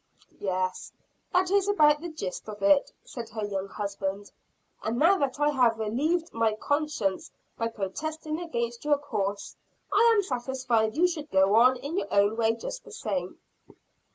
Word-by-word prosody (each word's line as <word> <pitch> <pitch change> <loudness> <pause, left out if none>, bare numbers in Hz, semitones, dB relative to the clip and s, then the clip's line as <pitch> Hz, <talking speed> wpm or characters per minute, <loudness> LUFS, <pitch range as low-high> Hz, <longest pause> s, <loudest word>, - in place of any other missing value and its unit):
"Yes, 185 -1 -2 0.4
that 365 0 +2
is 400 0 +3
about 300 -7 +4
the 345 - -5
gist 215 - -6
of 210 -1 -8
it," 295 -2 +4
said 235 -3 -7
her 215 -2 -4
young 195 -1 -3
husband. 200 0 -4 0.5
"And 225 +2 -2
now 350 +8 +4
that 280 0 -1
I 295 0 +3
have 250 -5 +3
relieved 300 +11 -1
my 225 -1 +2
conscience 285 -8 -1 0.3
by 230 - -1
protesting 305 - -4
against 235 -8 -3
your 295 -1 +3
course, 205 -8 -3 0.4
I 465 0 +6
am 410 - +3
satisfied 250 - -1
you 355 +2 +5
should 310 -4 -5
go 190 -3 +3
on 250 +4 +6
in 295 +9 -3
your - - -6
own 205 +2 +3
way 225 0 +2
just 365 - -6
the - - -14
same." - - -4
245 Hz, 165 wpm, -27 LUFS, 210-305 Hz, 0.5 s, I